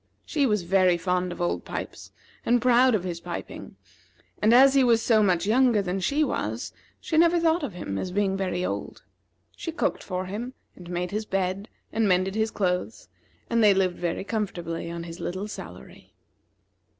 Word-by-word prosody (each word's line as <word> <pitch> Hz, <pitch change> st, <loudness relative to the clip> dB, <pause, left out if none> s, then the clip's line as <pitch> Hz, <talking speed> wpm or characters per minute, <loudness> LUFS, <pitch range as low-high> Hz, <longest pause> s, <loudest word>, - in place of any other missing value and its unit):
She 290 Hz, -4 st, +1 dB
was 210 Hz, -5 st, +1 dB
very 185 Hz, 0 st, +3 dB
fond 180 Hz, +1 st, -1 dB
of -, -, -8 dB
Old 175 Hz, -, -1 dB
Pipes, -, -, -7 dB, 0.3 s
and 240 Hz, +1 st, +3 dB
proud 250 Hz, 0 st, +4 dB
of 195 Hz, -, -1 dB
his 175 Hz, -2 st, -4 dB
piping; -, -, -7 dB, 0.7 s
and 215 Hz, -, +4 dB
as 265 Hz, +3 st, +7 dB
he 275 Hz, -1 st, +5 dB
was 235 Hz, -2 st, +4 dB
so 225 Hz, -1 st, +3 dB
much 180 Hz, -3 st, +2 dB
younger 240 Hz, +1 st, +3 dB
than 190 Hz, -1 st, -2 dB
she 285 Hz, +11 st, +1 dB
was, -, -, -3 dB, 0.3 s
she 320 Hz, -, 0 dB
never 340 Hz, +1 st, +4 dB
thought 330 Hz, +1 st, +2 dB
of 275 Hz, -10 st, -4 dB
him 100 Hz, -, -4 dB
as 185 Hz, -, -3 dB
being 195 Hz, +1 st, 0 dB
very 185 Hz, -2 st, -2 dB
old. -, -, -5 dB, 0.5 s
She 330 Hz, -, -5 dB
cooked 325 Hz, -, -1 dB
for 185 Hz, -1 st, -4 dB
him, 225 Hz, +7 st, -6 dB, 0.2 s
and 175 Hz, -2 st, -12 dB
made 180 Hz, 0 st, -3 dB
his 215 Hz, +1 st, -2 dB
bed, 195 Hz, +2 st, -2 dB, 0.2 s
and 220 Hz, -1 st, +2 dB
mended 185 Hz, +1 st, +2 dB
his 220 Hz, +1 st, 0 dB
clothes; 185 Hz, +1 st, -2 dB, 0.4 s
and 230 Hz, -1 st, +2 dB
they 205 Hz, -2 st, +6 dB
lived 185 Hz, -2 st, +1 dB
very 175 Hz, +1 st, -2 dB
comfortably 185 Hz, -6 st, -4 dB
on 170 Hz, 0 st, -5 dB
his 170 Hz, 0 st, -9 dB
little 185 Hz, +3 st, -4 dB
salary. 85 Hz, -, -11 dB
195 Hz, 185 wpm, -26 LUFS, 180-235 Hz, 0.7 s, as